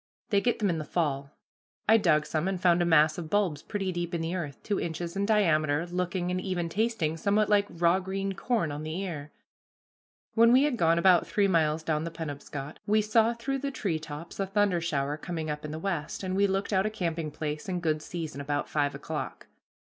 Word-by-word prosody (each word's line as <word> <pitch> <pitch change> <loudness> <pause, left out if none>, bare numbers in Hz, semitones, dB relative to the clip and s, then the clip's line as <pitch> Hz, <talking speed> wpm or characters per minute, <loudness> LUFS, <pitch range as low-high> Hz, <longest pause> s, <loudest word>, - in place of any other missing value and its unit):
They 200 -1 +4
get 240 +1 +1
them 205 -4 +1
in 165 - -2
the - - -3
fall. 140 -4 -1 0.6
I 220 +2 +7
dug 155 -7 +3
some, 160 +3 -1
and 190 -1 -1
found 175 -1 +4
a - - +3
mass 155 -1 +4
of 160 -2 -6
bulbs 185 -7 +1
pretty 195 -3 -3
deep 175 -1 -3
in 165 - -2
the 165 +2 -2
earth, 155 -7 -4
two 205 -2 -1
inches 170 +1 -4
in 200 +1 0
diameter, 165 -7 +2
looking, 180 0 -2
and 185 0 -1
even 180 -3 -2
tasting, 200 -6 0
somewhat 205 +5 +2
like 205 -1 +4
raw 170 +2 +2
green 195 +1 -3
corn 205 -6 0
on 145 +1 -5
the 155 +3 -4
ear. 155 -6 -5 1.0
When 230 0 +6
we 260 +3 +6
had 295 -3 +1
gone 165 -5 +3
about 180 0 +5
three 205 -1 +2
miles 160 -3 +2
down 155 -1 0
the 165 - -3
Penobscot, 145 -3 -6
we 215 +1 +3
saw 225 +2 +3
through 270 +4 -2
the 280 +1 -2
tree 195 -12 -2
tops 155 +3 -8
a 195 - 0
thunder 195 -3 +2
shower 145 -3 -1
coming 160 -1 -4
up 150 0 -5
in 150 - -5
the 155 - -5
west, 165 -1 -3
and 185 0 -2
we 200 +1 +4
looked 195 +2 -1
out 190 +2 +3
a - - 0
camping 170 -6 -2
place 150 +2 -4
in 180 -1 -1
good 155 -2 0
season, 155 -3 -5
about 145 +1 -2
five 145 -2 0
o'clock. 150 +2 -5
175 Hz, 220 wpm, -28 LUFS, 155-200 Hz, 1.0 s, I